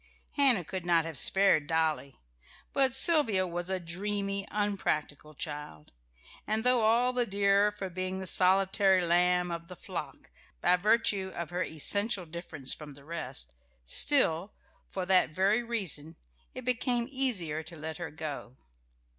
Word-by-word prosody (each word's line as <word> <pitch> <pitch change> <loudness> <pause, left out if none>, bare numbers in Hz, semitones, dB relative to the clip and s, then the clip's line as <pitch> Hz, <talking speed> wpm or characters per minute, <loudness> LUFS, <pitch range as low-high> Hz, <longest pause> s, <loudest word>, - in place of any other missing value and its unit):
Hannah 265 - +3
could 185 +2 -6
not 170 -2 +2
have 165 -2 -6
spared 175 0 +4
Dolly; 155 -4 -1 0.6
but 265 -2 +2
Sylvia 265 - +4
was 175 0 -4
a 190 -1 0
dreamy, 195 +3 -3
unpractical 155 -8 -3
child, 145 - -7 0.6
and 220 +1 -1
though 250 -1 +3
all 235 +3 +2
the 245 -1 0
dearer 200 +1 +2
for 205 -2 -6
being 185 +1 -5
the 190 - -6
solitary 190 +1 +3
lamb 180 +1 +2
of 170 0 -6
the 180 - -10
flock - - -8 0.3
by 180 - +3
virtue 200 -1 +1
of 170 -1 -5
her 175 +1 -3
essential 195 +5 +1
difference 155 -5 -4
from 150 -2 -9
the 140 0 -16
rest, 140 - -5 0.3
still, 190 - +2 0.4
for 185 -2 -4
that 180 -4 +2
very 200 +5 +2
reason, 185 -10 -3 0.4
it 255 - -8
became 245 -1 0
easier 200 - +2
to 160 +1 -12
let 160 +1 -6
her 175 -2 -6
go. 145 -5 -7
185 Hz, 145 wpm, -29 LUFS, 160-210 Hz, 0.6 s, spared